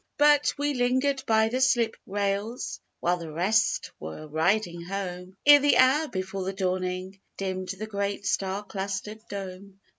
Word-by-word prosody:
But 295 0 +4
we 290 0 0
lingered 260 +2 +1
by 220 0 +4
the 255 +3 -1
slip 240 -4 +3
rails 200 +4 -2 0.2
While 175 +1 +2
the 165 -2 -7
rest 195 +8 +1
were 80 - -7
riding 170 +3 0
home, 185 0 -5
Ere 290 0 +9
the 290 +1 +4
hour 270 +5 +5
before 190 -3 -4
the 190 +1 -3
dawning, 185 0 -2 0.2
Dimmed 185 -1 -3
the 195 +3 -4
great 200 -1 -3
star 195 +1 -1
clustered 200 +2 -4
dome. 195 0 -7
200 Hz, 150 wpm, -27 LUFS, 185-235 Hz, 0.2 s, Ere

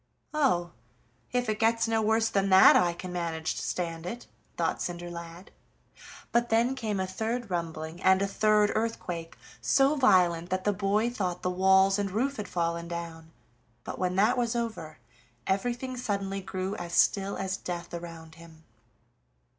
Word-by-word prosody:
"Oh! 180 - +1 0.6
if 245 -1 0
it 215 0 -1
gets 230 0 +2
no 225 -1 +1
worse 220 +1 +2
than 195 -2 0
that 190 0 +8
I 175 -1 +4
can 180 +1 -7
manage 165 -2 -2
to - - -5
stand 165 -1 -3
it," 235 +6 -6 0.3
thought - - 0
Cinderlad. 175 +1 -7 0.8
But 240 0 +2
then 235 +3 +3
came 220 -6 -3
a 190 - 0
third 220 +4 -3
rumbling, 165 -1 -4
and 190 0 +5
a 200 - +1
third 210 +1 +3
earthquake, 180 -7 -3 0.2
so 275 +2 +3
violent 180 - +3
that 185 0 -1
the 205 - +1
boy 210 +4 +1
thought 180 -6 -3
the 180 - 0
walls 190 +2 +4
and 200 -1 -1
roof 260 +8 -1
had 210 - -5
fallen 170 -1 -2
down, 165 -1 -7 0.5
but - - -7
when 180 0 0
that 215 +6 +3
was 240 0 0
over 200 -10 -4 0.5
everything 245 +6 -1
suddenly 200 -5 -3
grew 185 +1 -4
as 175 0 -6
still 195 +2 +2
as 190 -1 -2
death 175 -2 -6
around 165 -2 -8
him. 160 -1 -15
190 Hz, 160 wpm, -28 LUFS, 175-225 Hz, 0.8 s, that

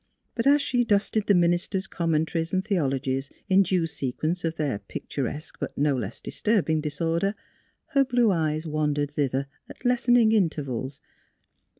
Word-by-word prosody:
But 230 +2 -1
as 285 +1 +5
she 245 -1 +1
dusted 210 -1 +1
the 205 - +5
minister's 175 +2 +1
commen 165 -4 0
taries 165 +1 -2
and 190 +1 +1
theologies 135 -8 -1 0.2
in 190 +1 +5
due 185 -3 +1
sequence 155 +4 -2
of 165 0 -1
their 145 -9 -1
picturesque 145 +7 -5
but - - -5
no 145 -1 +2
less 115 -3 -4
disturbing 180 -8 0
disorder, 165 +6 -1 0.5
her 275 -3 +4
blue 245 -4 +3
eyes 155 -2 0
wandered 150 -2 -1
thither 140 -2 0 0.2
at - - -13
lessening 245 -2 +4
intervals. 140 - -1
165 Hz, 150 wpm, -26 LUFS, 145-200 Hz, 0.5 s, as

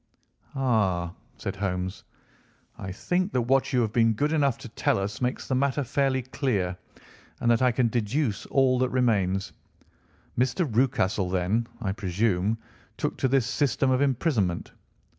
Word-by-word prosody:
"Ah," 100 -10 +1 0.2
said - - -4
Holmes, 95 -1 -3 0.7
"I 95 - -6
think 180 - -1
that 125 - +2
what 135 +3 +2
you 125 - +3
have 110 -2 -1
been 115 -1 +4
good 145 +8 0
enough 140 -5 +2
to 120 - -10
tell - - +1
us 100 +4 -3
makes 125 0 -2
the - - -1
matter 140 +2 +1
fairly 135 0 0
clear, 115 -9 -1 0.6
and 120 - +2
that 115 - +3
I 125 -1 +4
can 120 0 +2
deduce 115 +1 -1
all 130 -2 +3
that 130 0 +2
remains. 100 -7 +1 0.9
Mr. 130 +8 +2
Rucastle 110 -6 +1
then, 95 +6 0
I 95 - -1
presume, 100 +1 0 0.4
took - - -2
to - - +1
this 130 -2 +2
system 135 +1 +1
of 130 +1 +2
imprisonment?" 125 - 0
120 Hz, 155 wpm, -26 LUFS, 100-130 Hz, 0.9 s, been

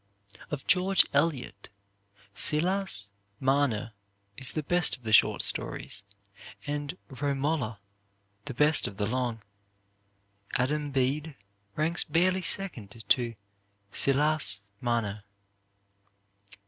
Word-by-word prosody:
Of 145 -3 -5
George 185 +1 +4
Eliot, 145 -2 -1 0.6
"Silas 155 - 0 0.3
Marner" 130 -5 0 0.4
is 135 -3 -4
the 155 - -3
best 175 0 +1
of 125 - -28
the 110 -1 -2
short - - +5
stories, - - +2 0.6
and 145 +3 -4
"Romola" 135 -3 -2 0.7
the 140 -4 -7
best 150 +4 +4
of 100 - -9
the 105 - -1
long. 120 -1 -3 1.1
"Adam 145 +4 0
Bede" 140 +3 -1 0.4
ranks 160 +3 0
barely 185 +4 +1
second 115 - +2
to 120 -2 +2 0.6
"Silas 140 -7 +2 0.2
Marner." 110 -4 -2
140 Hz, 95 wpm, -28 LUFS, 120-155 Hz, 1.1 s, short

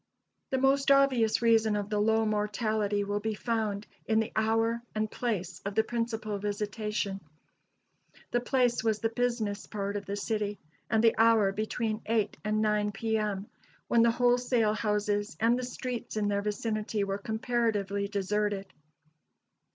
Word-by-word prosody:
The 265 - 0
most 270 +1 +3
obvious 260 -5 +4
reason 225 -2 +4
of 205 0 -3
the 210 - +1
low 220 +1 +3
mortality 210 -1 0
will 205 +1 -1
be 220 +1 -2
found 215 -3 -2 0.2
in 220 0 +3
the 220 - -1
hour 225 +1 +1
and 215 0 -1
place 185 -7 -3
of 200 0 -4
the 220 - +4
principal 225 -3 -3
visitation. 205 -1 -2 1.1
The 240 - +2
place 245 -2 +1
was 220 -2 +2
the 225 +1 -1
business 225 -4 -1
part 200 -1 -3
of 200 -1 -4
the 200 - -2
city, 210 -1 -2 0.3
and 220 -1 +2
the 230 - +6
hour 225 -3 +5
between 215 +1 -2
eight 215 -2 +1
and 215 0 +1
nine 210 -1 +1
P.M., 210 -2 -1 0.4
when 235 - +5
the 235 - +5
wholesale 245 -2 +2
houses 210 0 -1
and 230 +2 +4
the - - -3
streets 250 -2 -5
in 205 -1 +1
their 200 0 0
vicinity 210 0 -2
were 195 0 -2
comparatively 220 -3 -1
deserted. 200 0 -1
215 Hz, 150 wpm, -29 LUFS, 205-230 Hz, 1.1 s, the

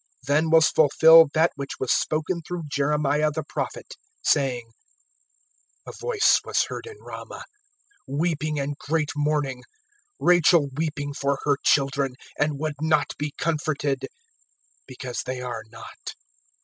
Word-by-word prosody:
(17)Then 155 +3 +2
was 160 -1 +6
fulfilled 160 +1 +6
that 160 +2 +4
which 140 -1 -6
was 130 - -1
spoken 160 +3 0
through 175 +1 -6
Jeremiah 150 +1 +1
the 150 - -4
prophet, - - -5 0.3
saying: 125 -5 +1 1.2
(18)A - - -9
voice 465 -3 +3
was - - +1
heard - - -6
in 435 -1 -10
Ramah, - - -9 0.6
Weeping, 155 +1 -1
and 140 +1 -3
great 155 0 -1
mourning[2:18]; 145 -3 -1 0.6
Rachel 175 -4 +4
weeping 145 -2 -3
for 140 0 -1
her 145 -1 +2
children, 135 -2 +2 0.2
And 145 -1 +1
would 155 0 -3
not 155 -2 +1
be 145 -1 -4
comforted, 150 -4 -1 0.8
because 125 -1 -5
they 130 0 -4
are 120 -3 -5
not. 115 0 -10
150 Hz, 130 wpm, -24 LUFS, 140-160 Hz, 1.2 s, was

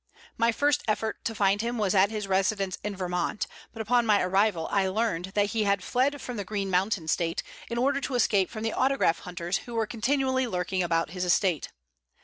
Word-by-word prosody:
My 230 0 +3
first 285 +4 +2
effort 220 +1 -1
to 225 - -2
find 200 0 +2
him 235 +1 -2
was 205 -3 +1
at 195 0 +5
his 215 -2 -3
residence 195 0 +1
in 210 -1 -3
Vermont, 180 +2 -2 0.3
but 225 -1 -5
upon 240 +2 +3
my 210 -2 +5
arrival 190 -2 +1
I 195 -1 +2
learned 190 -3 -1
that 205 0 +2
he 220 -2 0
had 200 -2 +1
fled 275 +3 +1
from 245 -3 -6
the 205 - -2
Green 195 0 -3
Mountain 185 -2 +1
State 165 +1 0 0.3
in 235 - -3
order 275 +3 +1
to 270 -1 -3
escape 205 -5 +3
from 215 -1 -6
the 225 - -1
autograph 260 -11 +2
hunters 175 +1 -3
who 240 - -9
were 225 -1 +1
continually 260 +3 0
lurking 185 -2 -1
about 165 -2 0
his 180 0 -3
estate. 180 -3 +1
205 Hz, 205 wpm, -27 LUFS, 185-230 Hz, 0.3 s, at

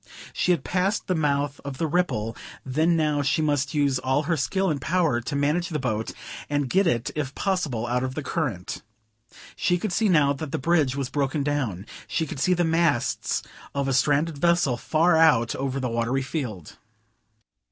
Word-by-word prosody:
She - - 0
had 175 - +2
passed 190 +3 0
the 185 - 0
mouth 145 -3 0
of 140 -2 -6
the 165 - 0
Ripple, 145 -10 0 0.3
then; 155 +6 +2
now, 150 -2 +1
she 140 +3 +1
must 145 -1 0
use 140 -3 +2
all 130 +3 +1
her 165 +3 0
skill 190 +5 0
and 140 -3 -3
power 160 -8 +1
to 120 +4 -4
manage 150 +5 +1
the 155 - -2
boat 110 -5 -2 0.4
and 145 -2 0
get 195 0 +3
it 120 -7 0
if 140 -3 -3
possible 165 - -1
out 125 +1 0
of 130 0 -3
the 155 - -3
current. 130 - -3 0.7
She 180 - +1
could 185 +1 -3
see 220 +1 +2
now 150 -5 +4
that 140 +1 -6
the - - -1
bridge 150 -3 +2
was 135 -2 -2
broken 140 0 0
down; 130 -10 -2 0.2
she 160 - -1
could 140 - -7
see 180 +6 +3
the 175 - +1
masts 165 -6 +1 0.3
of 140 -1 0
a 135 - +1
stranded 145 +3 +2
vessel 170 -5 +3
far 160 +7 +2
out 150 -8 +4
over 135 0 -2
the 130 - -1
watery 120 +3 0
field. 125 - -5
145 Hz, 190 wpm, -25 LUFS, 130-165 Hz, 0.7 s, now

